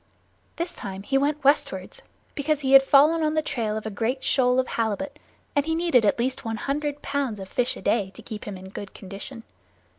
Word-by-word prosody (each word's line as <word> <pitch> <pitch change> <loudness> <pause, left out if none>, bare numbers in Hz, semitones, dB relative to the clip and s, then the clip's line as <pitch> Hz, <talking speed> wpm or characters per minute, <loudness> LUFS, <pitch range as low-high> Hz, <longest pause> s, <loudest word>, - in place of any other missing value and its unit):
This 345 +1 -3
time 195 -1 -7
he 270 - -2
went 285 +2 +1
westward, 280 +2 +1 0.3
because 300 +1 0
he 265 -1 0
had 270 - +11
fallen 290 +4 +5
on 310 0 +1
the 310 - +2
trail 220 -7 -2
of 220 - -6
a 220 - -3
great 240 +6 -2
shoal 250 -1 +3
of 260 - 0
halibut, 235 +7 -2 0.4
and 285 - +3
he 320 - +1
needed 325 -10 +3
at - - +2
least 255 +2 -1
one 225 -1 -3
hundred 290 +3 -2
pounds 275 -7 -2
of 190 - -7
fish 250 +5 -1
a - - -11
day 200 -4 +1
to - - -11
keep 215 -2 -7
him 205 -2 -6
in 190 +1 -10
good 200 0 -8
condition. 205 +5 -9
260 Hz, 215 wpm, -25 LUFS, 220-285 Hz, 0.4 s, had